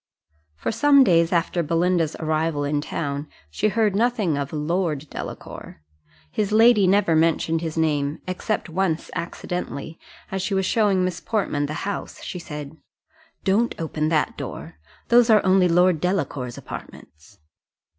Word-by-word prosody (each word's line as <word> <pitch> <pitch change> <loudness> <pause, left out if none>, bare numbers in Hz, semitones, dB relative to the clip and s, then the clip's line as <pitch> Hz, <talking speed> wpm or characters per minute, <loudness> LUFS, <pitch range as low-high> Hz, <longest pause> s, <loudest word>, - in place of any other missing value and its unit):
For - - -3
some 280 +3 +5
days 170 -6 +3
after 170 0 +1
Belinda's 165 0 +1
arrival 155 -1 -1
in 145 0 0
town 145 -1 -4 0.2
she 80 - 0
heard 210 -1 +1
nothing 220 - +1
of 140 -1 -3
Lord 155 -1 -1
Delacour; 75 - -8 0.5
his 210 -1 -1
lady 220 -2 +5
never 190 -3 +3
mentioned 165 0 +2
his 165 -1 -4
name, 150 -2 0
except 185 +4 -2
once 170 -1 -1
accidentally, 170 -2 -5 0.3
as 190 0 -2
she 195 +2 -1
was 190 0 +1
showing 195 -3 +2
Miss 180 -1 -3
Portman 170 -10 -1
the 155 +5 -5
house, 200 - -5
she 180 - -5
said, 150 -2 -8 0.7
"Don't 215 +5 +1
open 155 -1 -2
that 155 -2 +1
door 75 +2 -7 0.3
those 240 0 +5
are 215 -3 +5
only 185 -1 +4
Lord 175 -1 +3
Delacour's 145 -9 -2
apartments." 80 +7 -11
170 Hz, 145 wpm, -23 LUFS, 150-195 Hz, 0.7 s, some